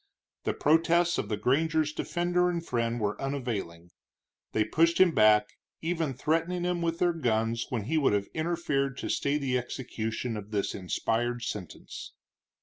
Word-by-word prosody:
The - - 0
protests 170 +3 +3
of - - -3
the 105 - -1
granger's 155 +6 +1
defender 175 +2 +1
and 170 -1 -3
friend 120 -2 -1
were 105 -1 -2
unavailing. 110 -11 -4 0.6
They 110 - +2
pushed 165 +9 +2
him 185 -2 +7
back, 105 -5 +5 0.3
even 160 -5 -1
threatening 165 +6 0
him 175 -1 0
with 165 0 0
their 175 0 +2
guns 115 -6 0
when 120 -6 -2
he 155 +9 +1
would 140 - +3
have 100 -1 +1
interfered 155 -5 -1
to - - -4
stay 140 +1 +1
the 130 -3 0
execution 120 -1 -4
of 105 0 -8
this 105 -2 -1
inspired 115 +5 -1
sentence. 100 -7 -7
135 Hz, 155 wpm, -29 LUFS, 110-165 Hz, 0.6 s, him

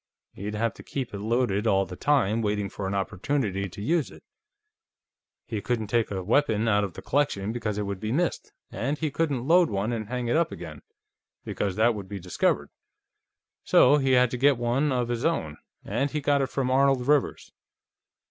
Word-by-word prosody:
He'd 105 +2 -5
have 115 0 0
to - - -13
keep 130 -5 -5
it 100 - -5
loaded 110 -1 0
all 95 -2 +3
the 90 - -8
time, 115 -4 +1
waiting 105 -2 -1
for 95 0 -5
an 100 - -2
opportunity 100 0 -1
to 100 +3 -8
use 165 +4 +1
it; - - -15 1.2
he 110 -3 -4
couldn't 110 -2 -2
take 115 -2 +2
a 95 -2 -4
weapon 110 0 +2
out 105 -2 +3
of 95 -4 -4
the - - -9
collection, 130 -8 0
because 115 -3 -3
it 105 - -1
would 100 -1 -4
be 110 +1 -3
missed, 170 +6 -1 0.2
and 140 +5 -2
he 155 -1 -2
couldn't 140 -5 -1
load 175 +1 +5
one 100 +3 -1
and 110 -2 -4
hang 125 -1 -3
it 120 - +1
up 165 0 +2
again, - - -8 0.6
because 100 -3 -2
that 115 +3 +3
would 100 -3 -7
be 100 -1 -5
discovered. 90 -1 0 0.9
So 140 +4 +5
he 135 -2 +2
had 125 -1 +4
to 125 - -2
get 140 +1 +4
one 120 +5 0
of 125 -2 0
his 120 +1 -3
own, 80 - -1 0.3
and 125 +8 -1
he 150 - -2
got 145 0 +2
it 135 - 0
from 130 -2 -1
Arnold 135 -1 +3
Rivers." 145 -2 +1
115 Hz, 200 wpm, -26 LUFS, 100-135 Hz, 1.2 s, load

